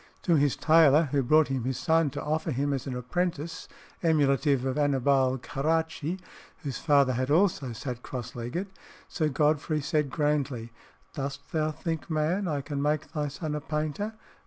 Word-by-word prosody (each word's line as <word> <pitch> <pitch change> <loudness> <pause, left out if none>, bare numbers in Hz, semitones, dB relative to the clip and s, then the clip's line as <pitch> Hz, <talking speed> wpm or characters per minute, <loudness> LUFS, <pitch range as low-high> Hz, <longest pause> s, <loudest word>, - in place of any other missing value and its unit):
To 175 - +2
his 145 -2 +3
tailor 155 -1 +5
who 140 - +2
brought 155 +4 +4
him 130 -3 -1
his 130 0 -2
son 160 -1 +2
to 140 - -6
offer 160 +2 -1
him 140 +2 0
as 135 0 -3
an 130 - -3
apprentice 165 +4 -3 0.3
emulative 140 -4 +2
of 130 - -1
Annibale 135 -2 +2
Caracci, 160 +5 -1 0.5
whose 140 -4 -4
father 140 -4 +4
had 130 +2 -1
also 155 -5 +2
sat 125 +1 -5
cross 125 -2 -6
legged, 145 +12 -4 0.4
Sir 155 -4 0
Godfrey 150 +2 +1
said, 150 0 0
grandly, 140 -5 -1 0.4
"Dost 140 -1 -5
thou 155 -1 +1
think, 160 +1 -4
man, 165 +5 0
I 145 -3 -1
can 140 0 -4
make 150 +1 0
thy 150 -2 -1
son 150 +2 -4
a 150 - -3
painter? 155 +8 -3
150 Hz, 165 wpm, -28 LUFS, 135-160 Hz, 0.5 s, tailor